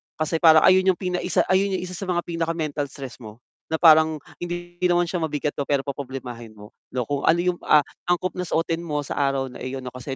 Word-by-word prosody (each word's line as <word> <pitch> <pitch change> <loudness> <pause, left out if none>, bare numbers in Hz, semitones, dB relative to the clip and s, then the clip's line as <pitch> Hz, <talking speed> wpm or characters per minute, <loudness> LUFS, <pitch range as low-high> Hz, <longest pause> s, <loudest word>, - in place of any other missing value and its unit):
kasi 155 +1 -1
parang 160 -2 +7
ayun 185 0 +5
yung 190 - +5
pinaisa 180 0 0
ayun 190 +1 +2
yung 185 - -3
isa 185 - -6
sa 195 - -6
mga 175 -1 0
pinaka-mental 165 -3 -2
stress 135 -2 -9
mo 110 0 -12 0.2
na 160 - -1
parang 160 -1 +6 0.2
hindi 175 0 -6
naman 175 0 +3
siya 180 - -1
mabigat 150 -2 -2
'no, 140 - -2
pero 140 -2 +1
poproblemahin 130 -5 -7
mo, 105 +1 -13 0.2
'no. 125 - 0
Kung 140 +3 -3
ano 165 +2 +5
yung, 180 -1 0
ah, 150 -1 +6 0.2
angkop 175 0 +1
na 180 - -3
suotin 165 +1 0
mo 150 -4 -3
sa - - -5
araw 135 -2 0
na - - -11
iyon 130 0 -5
'no 125 - -6
kasi 130 +2 -6
160 Hz, 225 wpm, -23 LUFS, 135-175 Hz, 0.2 s, parang